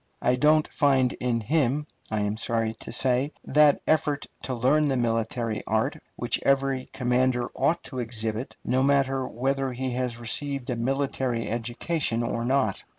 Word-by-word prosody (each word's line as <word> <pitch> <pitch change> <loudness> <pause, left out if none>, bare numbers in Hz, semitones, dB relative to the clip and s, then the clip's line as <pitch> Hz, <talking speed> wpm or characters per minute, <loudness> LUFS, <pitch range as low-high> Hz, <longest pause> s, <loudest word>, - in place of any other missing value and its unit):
I 125 - +3
don't 150 +3 +4
find 135 -3 +2
in 120 -2 0
him, 145 +3 +1 0.2
I 110 -1 -1
am 105 0 -1
sorry 115 0 -1
to 110 - -9
say, 130 +4 +2
that 150 +1 +4
effort 150 -2 +1 0.2
to 130 - -2
learn 140 +6 +3
the 135 - +1
military 115 -1 -1
art - - 0
which - - -1
every 135 -1 +1
commander 125 0 +1
ought 170 +2 +1
to 130 - -6
exhibit, 115 0 -3
no 130 +2 +2
matter 135 -1 +2
whether 135 +2 -1
he 130 +1 -3
has 125 -1 -2
received 130 +3 -1
a - - -1
military 130 -1 -1
education 120 +2 -1
or 115 0 -2
not. 130 -6 +1
130 Hz, 155 wpm, -26 LUFS, 115-140 Hz, 0.2 s, don't